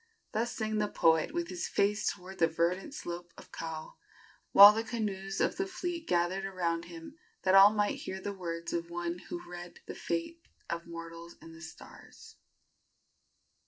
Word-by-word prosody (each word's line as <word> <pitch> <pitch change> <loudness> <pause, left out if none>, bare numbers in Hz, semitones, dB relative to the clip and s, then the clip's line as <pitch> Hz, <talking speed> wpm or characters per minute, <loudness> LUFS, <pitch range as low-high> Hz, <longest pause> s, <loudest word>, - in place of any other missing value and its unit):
Thus 230 +2 -1
sang 220 -3 -2
the 210 - +1
poet, 160 - +3
with 340 +1 -3
his 355 - -3
face 205 +1 +1
toward 190 +2 -11
the 165 - +5
verdant 175 - -1
slopes 175 - -7
of - - -14
Kau, 160 -1 -7 0.5
while 200 +1 +11
the 225 +1 -1
canoes 195 -5 -3
of - - +1
the 385 - -1
fleet 350 -3 -4
gathered 175 +2 +1
around 170 -3 -2
him, 170 - -11 0.2
that 185 - +3
all 195 +1 +9
might 205 -1 0
hear 190 - -5
the 200 +1 -4
words 170 -3 -5
of 170 0 -2
one 175 0 -3
who 345 0 -6
read 175 0 -9
the - - -7
fate 170 - -3 0.3
of 170 0 -4
mortals 165 0 -9
in 165 - -13
the 165 - -13
stars. 160 -1 -13
185 Hz, 170 wpm, -31 LUFS, 170-210 Hz, 0.5 s, while